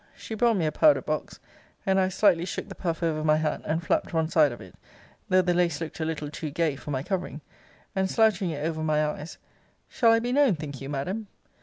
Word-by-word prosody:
She - - -8
brought 230 0 +2
me 170 - 0
a 155 - +1
powder 300 - +4
box, - - -4 0.5
and 190 0 +3
I 185 - +3
slightly 190 -2 +3
shook 180 - -5
the - - -6
puff 170 -1 -3
over 155 -2 0
my 155 0 +4
hat, 155 -1 -1
and 160 +2 -1
flapt - - 0
one 160 -1 +1
side 155 -4 +4
of 120 - -8
it, - - -12 0.6
though 185 0 +4
the 180 0 +1
lace 175 -3 +1
looked 165 -1 -6
a 160 - -1
little 150 -2 -4
too 155 0 -5
gay 155 0 0
for 145 - -10
my 135 -2 -2
covering; 180 -4 -3 0.5
and, 190 0 +1
slouching 210 -4 +2
it 150 -2 -3
over 160 -1 -2
my 155 -1 +1
eyes, 150 +1 -5 0.5
Shall 230 -2 +3
I 225 - +5
be 240 +2 -2
known, 270 -6 +4
think 145 -3 -7
you, 135 - -6
Madam? 185 +10 -3
165 Hz, 230 wpm, -26 LUFS, 155-190 Hz, 0.6 s, I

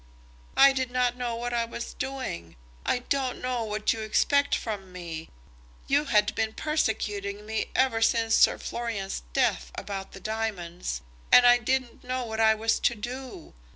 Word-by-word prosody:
"I 275 0 +8
did 260 -2 -1
not 250 -1 +1
know 245 -2 -3
what 240 +1 -3
I 235 -1 +2
was 235 0 -6
doing. 255 - -5 0.3
I 245 - +1
don't 265 -3 0
know 250 -2 -1
what 215 -1 0
you 225 - -6
expect 280 +6 +2
from 200 -4 -5
me. 170 -3 -7 0.6
You 285 +2 +2
had 210 -5 +3
been 220 0 -1
persecuting 210 -9 -1
me 220 0 -2
ever 255 -4 +2
since 225 -1 +3
Sir - - +5
Florian's 225 - -4
death - - +1
about 195 -1 -6
the - - -9
diamonds, 180 - -3 0.3
and 250 - +9
I 245 0 +7
didn't 255 0 -1
know 255 0 -2
what 220 -1 -5
I 220 0 +5
was 225 +1 +1
to 240 - +2
do. 245 -4 -7
225 Hz, 165 wpm, -27 LUFS, 210-250 Hz, 0.6 s, and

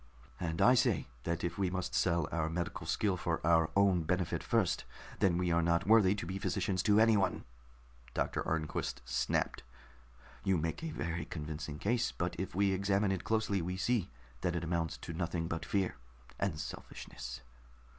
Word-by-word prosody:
"And 85 -1 0
I 125 - +7
say 125 - +2 0.2
that 85 0 -1
if 85 +1 -2
we 95 -2 +2
must 90 0 -3
sell 85 -3 +2
our 80 -1 0
medical 85 +1 -3
skill 100 -4 +1
for 85 -1 -1
our 80 -1 +4
own 100 -3 +4
benefit 90 +1 0
first, - - +1 0.4
then 90 -3 +3
we 90 -1 +1
are 85 0 +3
not 85 0 +2
worthy 105 -2 +6
to 100 - -4
be 95 +3 -4
physicians 95 -2 0
to 105 +1 +4
anyone," 110 -4 +3 0.7
Doctor - - 0
Arnquist 80 -2 -2
snapped. - - 0 0.8
"You 95 -2 +3
make 80 - -2
a 165 - -2
very 85 - -3
convincing 75 -1 -5
case, 120 +7 +1
but 85 +1 -2
if 95 - -4
we 100 0 +3
examine 100 +1 +2
it 95 -2 -2
closely, 110 -3 +1
we 90 +2 -3
see 115 -1 +1 0.3
that 90 - 0
it 85 - -1
amounts 85 -1 -1
to 85 - -7
nothing 85 0 -2
but 80 0 -3
fear 95 -3 0 0.4
and 95 -6 -1
selfishness." 60 -5 -7
90 Hz, 175 wpm, -33 LUFS, 85-100 Hz, 0.8 s, I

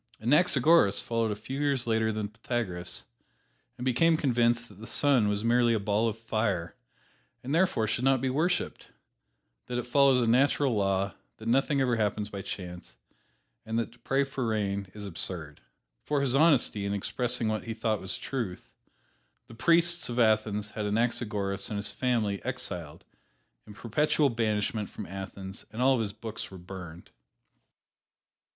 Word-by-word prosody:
Anaxagoras 140 - +4
followed 115 -1 -1
a 105 - -1
few 130 +6 -6
years 140 -4 +1
later 110 -1 +1
than 105 -1 -3
Pythagoras, 105 -5 -3 0.7
and 125 - -5
became 160 +6 +3
convinced 120 -4 +2
that 100 -3 -16
the 110 - -9
sun 135 -7 +3
was 105 +1 -1
merely 120 0 +3
a - - 0
ball 105 +3 +1
of 110 -1 -2
fire 110 -6 -1 0.7
and 135 +3 -3
therefore 165 -10 +2
should 115 +3 -1
not 135 0 +4
be 130 - -1
worshiped; 170 +6 -1 0.8
that 125 - -3
it 125 - -2
follows 135 0 +4
a 120 - +2
natural 135 +3 +3
law, 100 -1 0 0.2
that 110 - -9
nothing 135 +3 +2
ever 125 -3 +2
happens 105 -1 -1
by 100 - -5
chance, 90 -5 -7 0.7
and 110 0 -3
that 115 -1 -1
to 120 - -21
pray 135 +4 +1
for 135 -3 -3
rain 100 -3 -1
is 105 -1 -7
absurd. 80 -4 -3 0.4
For 145 -1 0
his 135 -3 +1
honesty 135 -8 +3
in 100 0 -1
expressing 120 +3 0
what 110 0 -2
he 115 -1 -4
thought 110 -2 -1
was 95 - -4
truth, 115 -10 -5 0.7
the - - -14
priests 170 +5 +2
of 120 - -4
Athens 110 -2 +2
had 105 -1 -3
Anaxagoras 105 -3 -1
and 105 - -3
his 100 +1 -3
family 115 -6 -1
exiled - - -5 0.6
to 105 - -10
perpetual 140 +5 +1
banishment 110 -2 -1
from 105 - -7
Athens 95 0 -7
and 110 - -8
all 130 +2 +5
of 125 - +1
his 105 -2 -2
books 110 +1 -6
were 95 - -10
burned. 90 -2 -10
115 Hz, 165 wpm, -29 LUFS, 105-125 Hz, 0.8 s, all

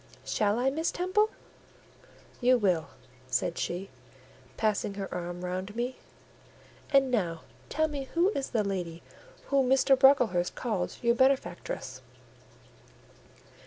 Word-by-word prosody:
"Shall 210 0 +1
I, 260 +2 +2
Miss 320 +4 -1
Temple?" 375 +5 +1 1.1
"You 250 0 +4
will," 180 -8 +1 0.4
said 170 +6 -1
she, 185 +3 -3 0.7
passing 210 -2 0
her 195 -1 -4
arm 175 0 -5
round 185 +3 -4
me. 245 +2 -2 0.9
"And 270 -2 +4
now 170 -9 -1 0.3
tell 315 +1 +1
me 285 -3 -5
who 345 +3 +4
is 280 -10 -3
the 220 -4 +1
lady 180 -4 -4 0.5
whom 275 -2 +3
Mr. 270 +1 +5
Brocklehurst 250 -10 +4
called 210 -7 -2
your 235 0 +4
benefactress?" 265 - 0
235 Hz, 120 wpm, -29 LUFS, 185-270 Hz, 1.1 s, Mr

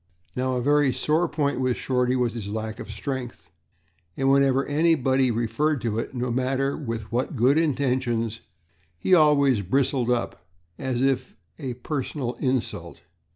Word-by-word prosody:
Now, 130 0 0
a 125 - -1
very 145 0 +3
sore 155 +6 +1
point 145 -4 -1
with 130 -1 0
Shorty 125 -1 0
was 125 -3 0
his 110 -4 -6
lack 110 +1 -4
of - - -8
strength, 120 - -6 0.7
and 135 0 +2
whenever 135 -1 +3
anybody 140 -4 +2
referred 130 +6 0
to 115 -2 -1
it, 120 - -5
no 125 0 -2
matter 130 +3 0
with 115 -6 -5
what 125 +5 -1
good 130 +6 +4
intentions, 125 -7 0 0.6
he 90 - +1
always 140 - +5
bristled 130 +4 +1
up 120 -6 -1 0.4
as 130 -1 -1
if 130 -2 0 0.2
at - - -7
a 125 - -2
personal 130 -1 -3
insult. 130 -3 -2
130 Hz, 155 wpm, -25 LUFS, 120-140 Hz, 0.7 s, always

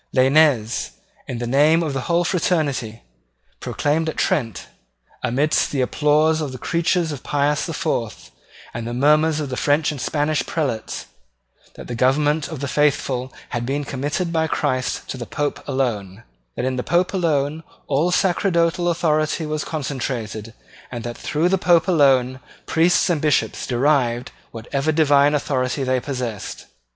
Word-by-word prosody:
Lainez, 130 -4 +3 0.3
in 125 - -4
the 120 - -3
name 150 +7 +4
of 150 -4 -2
the 135 - -2
whole 170 +1 +3
fraternity, 145 - -1 0.6
proclaimed 160 +2 -1
at - - -6
Trent, 115 -9 -1 0.6
amidst 145 +6 +1
the 140 - -1
applause 150 +4 +2
of 145 -3 -3
the 130 - -7
creatures 170 +2 0
of 140 -3 -6
Pius 145 +2 0
the 165 - -4
Fourth, 115 -6 -3 0.4
and 115 -1 -5
the 120 - -4
murmurs 150 +3 +3
of 140 -4 -4
French 145 +1 +2
and 145 -4 -6
Spanish 150 -1 0
prelates, 135 -9 -3 0.7
that - - -9
the 125 - -5
government 145 +5 +2
of 155 -5 -7
the 140 - -2
faithful 130 -2 0 0.2
had 120 -1 -3
been 140 +4 -2
committed 145 +6 -3
by 160 -1 +1
Christ 130 -5 -1
to - - -4
the 120 - -6
Pope 145 -1 -3
alone, 110 -6 -2 0.3
that - - -2
in 130 0 -1
the - - 0
Pope 175 +2 +1
alone 155 -4 0 0.2
all 145 +5 +1
sacerdotal 175 -2 +1
authority 155 -1 0
was 155 0 -2
concentrated, 120 -7 -4 0.3
and 120 -2 -6
that 120 0 -5
through 155 +3 0
the 190 +1 +1
Pope 170 -3 +3
alone 135 -6 +3 0.3
priests 170 +3 +3
and 160 -4 0
bishops 150 -3 0
derived 125 -2 +1 0.2
whatever 135 +6 -2
divine 145 -2 +4
authority 135 -1 -1
they 130 0 +1
possessed. 125 -6 -5
145 Hz, 155 wpm, -21 LUFS, 130-160 Hz, 0.7 s, name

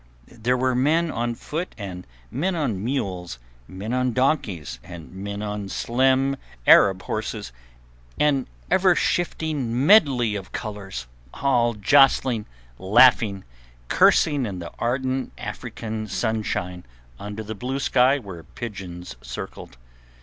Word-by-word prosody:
There 120 +2 -1
were 130 0 +1
men 155 +6 +2
on 120 0 -2
foot 165 +9 -5
and 90 - -7 0.2
men 175 +9 -1
on 120 - -1
mules, 95 - -3 0.3
men 100 +5 -5
on 125 -1 +1
donkeys 105 - 0
and 85 -2 -10
men 100 +2 -5
on 105 -1 -4
slim 130 +5 +1 0.3
Arab 95 -1 +6
horses, - - -4 0.7
an 140 -3 +2 0.2
ever 185 -2 +4
shifting 145 -8 -1
medley 140 - +5
of 95 -2 -6
colours, 100 - -6 0.3
all 120 -4 +2
jostling, 125 0 +4 0.3
laughing, 100 0 +5 0.5
cursing 145 -5 +4
in 95 -3 -5
the 85 -1 -7
ardent 130 +2 -1
African 110 -1 -5
sunshine 100 -5 -2 0.4
under 105 +1 -6
the 110 +1 -5
blue 125 +5 -4
sky 135 0 +3
where 95 -10 -9
pigeons 90 - -8
circled. 65 - -8
115 Hz, 120 wpm, -24 LUFS, 100-135 Hz, 0.7 s, Arab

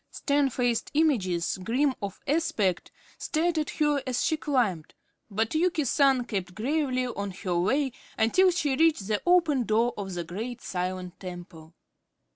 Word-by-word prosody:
Stern 285 -1 +1
faced 245 -2 0
images, 190 - +1
grim 260 +6 +1
of 200 -1 -5
aspect, 230 - 0 0.3
stared 330 +1 0
at 305 - -2
her 295 -2 +1
as 250 -1 0
she 315 - +2
climbed, 240 - -1 0.3
but 220 +2 -1
Yuki 325 -2 +1
San 270 -1 +3
kept 190 -6 -4
gravely 255 +1 0
on 200 -5 -4
her 180 -2 -2
way 265 +9 +1 0.3
until 370 +13 +4
she 295 -6 0
reached 315 -8 +3
the 210 -1 0
open 330 -7 +4
door 230 +2 +1
of 195 -3 -5
the 175 - -3
great 220 +9 -6
silent 180 -1 -4
temple. 175 -3 -10
240 Hz, 150 wpm, -27 LUFS, 190-295 Hz, 0.3 s, until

